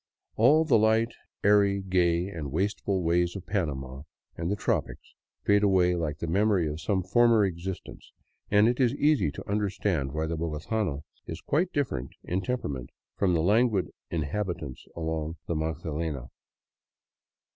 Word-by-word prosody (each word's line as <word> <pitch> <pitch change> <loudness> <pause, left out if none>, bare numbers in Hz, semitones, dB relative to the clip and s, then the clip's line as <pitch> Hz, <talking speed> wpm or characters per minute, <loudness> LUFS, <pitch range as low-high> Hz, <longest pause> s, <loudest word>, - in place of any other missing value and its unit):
All 150 +8 +5
the 135 - +4
light, 110 +2 +3 0.3
airy, 100 -1 +4
gay 90 -2 +1
and 80 -8 -6
wasteful 95 +2 -1
ways 85 +2 +1
of 95 -2 -7
Panama 70 -9 -3 0.3
and 85 +1 -3
the 100 - +1
tropics 105 - -2 0.3
fade 100 0 +4
away 95 -3 +4
like 80 -4 -2
the 85 - -4
memory 95 0 +2
of 75 +2 -4
some 95 +3 0
former 115 +2 +4
existence, 90 0 -6 0.4
and 105 +2 +5
it 120 +2 +1
is 125 0 +3
easy 145 - +3
to 70 - -9
understand 100 -8 -1
why 80 +2 -1
the 80 +1 -2
bogotano 80 0 -2 0.2
is - - -5
quite 170 +5 0
different 65 - -2
in 90 +2 -1
temperament 70 - -3 0.3
from 90 -3 +2
the 80 - +1
languid 105 0 +2 0.2
inhabitants 85 -3 -3
along 80 0 -3
the 85 - -2
Magdalena. 80 -3 -3
90 Hz, 145 wpm, -28 LUFS, 80-105 Hz, 0.4 s, All